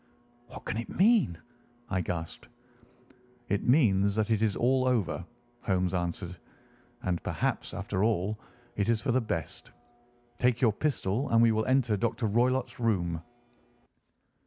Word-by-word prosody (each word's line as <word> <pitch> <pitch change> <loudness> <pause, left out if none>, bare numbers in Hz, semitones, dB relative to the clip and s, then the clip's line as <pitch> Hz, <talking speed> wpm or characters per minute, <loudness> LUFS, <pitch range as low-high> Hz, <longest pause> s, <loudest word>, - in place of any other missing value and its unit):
"What 130 - -11
can - - -2
it 115 - -4
mean?" 200 - +3 0.5
I 95 -4 -1
gasped. 85 -1 -5 1.0
"It 100 - +1
means 100 -7 +4
that 110 0 0
it 110 -1 +2
is 110 -3 +1
all 130 +1 +2
over," 95 -10 0 0.4
Holmes 90 -1 0
answered. 90 0 -3 0.7
"And 90 -2 -1
perhaps, - - -2
after 100 -1 -2
all, 105 -1 0 0.4
it 100 +1 0
is 115 -2 +3
for 125 +3 -1
the 130 +2 +2
best. 85 -8 -5 0.7
Take 125 -1 +2
your 115 -5 +3
pistol, 130 -1 -1
and 115 - +4
we 115 0 +6
will 110 0 0
enter 130 -5 +2
Dr. 115 +3 -1
Roylott's 120 +3 +1
room." 90 -8 0
110 Hz, 140 wpm, -29 LUFS, 95-120 Hz, 1.0 s, we